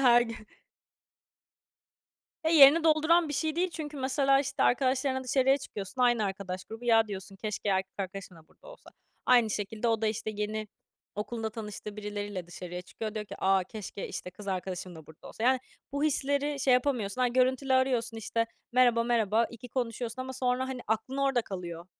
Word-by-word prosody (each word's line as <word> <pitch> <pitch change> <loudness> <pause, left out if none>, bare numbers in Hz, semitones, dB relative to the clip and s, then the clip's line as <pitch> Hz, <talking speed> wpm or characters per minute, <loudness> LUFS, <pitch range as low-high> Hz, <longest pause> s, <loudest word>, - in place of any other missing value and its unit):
Her 240 -2 +7
gün. 230 -2 -7 2.0
Eee, 320 - +2
yerini 295 +4 +9
dolduran 315 +1 +4
bir - - -3
şey 310 +2 -1
değil 360 +1 +1
çünkü 300 -3 -6
mesela, 275 +1 +3
işte, 275 0 -2
arkadaşlarınla 260 +1 +2
dışarıya 265 +2 +3
çıkıyorsun, 215 0 -5
aynı 240 -3 +3
arkadaş 190 -1 -4
grubu. 225 +2 -9
Ya 225 -2 +4
diyorsun, 195 0 -7
"Keşke 210 0 -4
erkek 190 0 0
arkadaşım 190 -2 -6
da 160 -1 -18
burada - - -19
olsa." - - -14 0.4
Aynı 240 -3 +5
şekilde 210 +3 -2
o 225 -1 +1
da, - - +3
işte, 215 0 -2
yeni 210 +1 -3 0.5
okulunda 220 +2 -3
tanıştığı 210 -1 -7
birileriyle 205 -3 -5
dışarıya 180 +1 -7
çıkıyor. 215 +4 -6
Diyor 215 -1 -3
ki, - - -8
"A, 190 -1 +3
keşke, 205 0 -7
işte, 180 - -6
kız 200 +2 -10
arkadaşım 185 -1 -4
da 160 -2 -12
burada 160 - -13
olsa." 220 - -8
Yani 260 0 +4 0.3
bu 285 +1 -1
hisleri 285 0 0
şey 255 -1 +4
yapamıyorsun. 250 -3 0
Ha, 250 - +4
görüntülü 260 +2 +2
arıyorsun, 245 -3 +2
işte, 230 +1 -1 0.3
merhaba, 240 -2 +4
merhaba, 230 -1 +2
iki 240 +1 -10
konuşuyorsun 240 0 -3
ama 260 0 -6
sonra, 255 0 0
hani, 255 -2 -4
aklın 220 +5 -1
orada 270 -3 +2
kalıyor. 175 -3 -7
230 Hz, 175 wpm, -29 LUFS, 205-260 Hz, 2.0 s, yerini